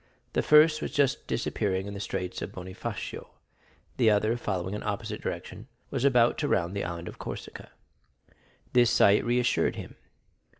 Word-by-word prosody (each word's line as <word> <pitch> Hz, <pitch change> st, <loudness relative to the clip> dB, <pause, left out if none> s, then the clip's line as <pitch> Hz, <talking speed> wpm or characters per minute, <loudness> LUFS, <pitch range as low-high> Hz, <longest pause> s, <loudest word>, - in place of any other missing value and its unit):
The -, -, +2 dB
first 155 Hz, +1 st, +5 dB
was -, -, -2 dB
just 140 Hz, -2 st, +1 dB
disappearing 100 Hz, -5 st, -1 dB
in 100 Hz, -, -6 dB
the 100 Hz, -, -6 dB
straits 90 Hz, -2 st, -4 dB
of -, -, -5 dB
Bonifacio; 95 Hz, +4 st, -6 dB, 0.6 s
the 115 Hz, -4 st, +5 dB
other, 110 Hz, +2 st, +2 dB
following 95 Hz, -5 st, -3 dB
an 105 Hz, -, -4 dB
opposite 105 Hz, -2 st, -4 dB
direction, -, -, -6 dB, 0.2 s
was 135 Hz, -2 st, -2 dB
about 125 Hz, -4 st, +4 dB
to 150 Hz, -, 0 dB
round 90 Hz, -4 st, 0 dB
the 100 Hz, -, -1 dB
Island 85 Hz, 0 st, -5 dB
of -, -, -9 dB
Corsica. -, -, -7 dB, 1.0 s
This 120 Hz, -1 st, +5 dB
sight 105 Hz, -3 st, +5 dB
reassured 120 Hz, +1 st, +1 dB
him. -, -, -9 dB
110 Hz, 160 wpm, -28 LUFS, 95-125 Hz, 1.0 s, first